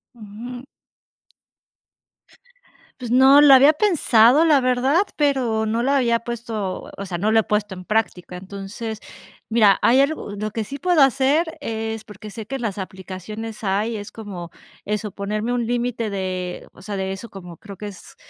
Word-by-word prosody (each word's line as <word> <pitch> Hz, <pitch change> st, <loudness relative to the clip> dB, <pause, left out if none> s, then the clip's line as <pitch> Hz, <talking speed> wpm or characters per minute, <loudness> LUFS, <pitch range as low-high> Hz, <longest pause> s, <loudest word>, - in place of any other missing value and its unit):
Ujú. 235 Hz, +3 st, -9 dB, 2.4 s
Pues 245 Hz, -2 st, -6 dB
no, 265 Hz, +3 st, +7 dB
lo 290 Hz, -2 st, +8 dB
había 275 Hz, +3 st, +7 dB
pensado, 295 Hz, -, +4 dB
la 300 Hz, -4 st, +4 dB
verdad, 255 Hz, +6 st, +2 dB
pero 255 Hz, -7 st, +1 dB
no 225 Hz, +2 st, 0 dB
lo 270 Hz, -, +1 dB
había 240 Hz, -4 st, +2 dB
puesto 225 Hz, -5 st, -5 dB
O 200 Hz, -, -5 dB
sea, 180 Hz, -2 st, -4 dB
no 210 Hz, +5 st, 0 dB
lo 225 Hz, -, +5 dB
he -, -, +2 dB
puesto 210 Hz, -1 st, -1 dB
en 185 Hz, -1 st, -10 dB
práctica. 185 Hz, -4 st, -2 dB
Entonces 200 Hz, +4 st, -7 dB, 0.5 s
mira, 215 Hz, -4 st, +5 dB
hay 245 Hz, +3 st, +4 dB
algo 280 Hz, -5 st, 0 dB
lo 215 Hz, +1 st, -3 dB
que 225 Hz, +1 st, -3 dB
sí 275 Hz, +7 st, -7 dB
puedo 355 Hz, -2 st, +3 dB
hacer 275 Hz, +5 st, +2 dB
es 225 Hz, -4 st, -4 dB
porque 210 Hz, 0 st, -11 dB
sé 220 Hz, +1 st, -7 dB
que 270 Hz, -, -5 dB
en 265 Hz, -, -5 dB
las 215 Hz, -4 st, -3 dB
aplicaciones 195 Hz, +4 st, -7 dB
hay 210 Hz, +4 st, 0 dB
es 205 Hz, -1 st, -8 dB
como 195 Hz, -6 st, -8 dB, 0.4 s
eso 210 Hz, 0 st, -3 dB
ponerme 210 Hz, +4 st, -3 dB
un 240 Hz, -2 st, -1 dB
límite 240 Hz, -2 st, -1 dB
de 185 Hz, -2 st, -4 dB
o -, -, -16 dB
sea, 205 Hz, +1 st, -5 dB
de 190 Hz, 0 st, -2 dB
eso 195 Hz, +4 st, -7 dB
como 175 Hz, -3 st, -11 dB
creo 200 Hz, +3 st, -11 dB
que 210 Hz, -, -7 dB
es, 195 Hz, -3 st, -12 dB
220 Hz, 175 wpm, -22 LUFS, 200-250 Hz, 2.4 s, lo